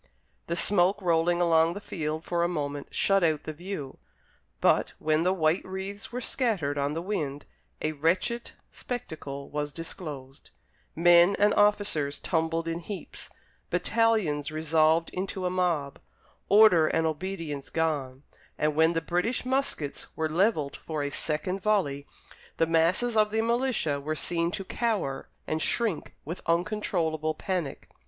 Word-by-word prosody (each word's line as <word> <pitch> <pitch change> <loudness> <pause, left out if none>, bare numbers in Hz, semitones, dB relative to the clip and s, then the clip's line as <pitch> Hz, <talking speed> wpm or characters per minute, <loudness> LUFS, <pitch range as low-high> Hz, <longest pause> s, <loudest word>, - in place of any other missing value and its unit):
The 170 - -1
smoke 195 +2 +3
rolling 175 -1 +2
along 165 0 +3
the - - -4
field 155 -5 -4
for 170 -1 0
a - - +3
moment 145 -4 -3
shut 195 -1 +2
out 155 -3 +1
the 155 - -5
view, 155 -5 -6 0.6
but, - - +3
when 155 0 +1
the 180 +2 +2
white 165 -1 +1
wreaths 190 +3 -6
were 245 - -3
scattered 210 - -1
on 145 +1 -1
the 165 - -3
wind, 150 -8 -3 0.4
a 155 - +1
wretched 170 +10 0 0.2
spectacle 155 - -6
was 145 0 -2
disclosed: 145 -4 -8 0.5
men 175 +3 +6
and 205 +1 +4
officers 205 -9 +2
tumbled 165 +1 -1
in 165 0 -2
heaps, 190 +3 -8 0.4
battalions 215 -11 +1
resolved 160 +1 +2
into 185 0 -4
a 180 - 0
mob, 170 -6 -1 0.5
order 200 -7 +7
and 160 +1 +1
obedience 160 -3 -4
gone; 145 -5 -2 0.3
and, 150 0 +1
when 160 +2 +4
the 165 - 0
British 180 +10 -1
muskets 255 - -2
were 160 - 0
levelled 160 -3 +1
for 155 -3 -4
a 145 - -3
second 180 +7 -2
volley, 170 -10 0 0.5
the 165 - +3
masses 170 +9 +2
of 215 -1 +4
the 220 +1 0
militia 230 - 0
were 155 +2 -2
seen 170 +2 0
to 195 +1 -5
cower 200 - -2 0.2
and 155 0 -1
shrink 220 -4 +1
with 165 +5 -5
uncontrollable 165 -4 0
panic. 175 -5 -3
165 Hz, 145 wpm, -28 LUFS, 155-195 Hz, 0.6 s, order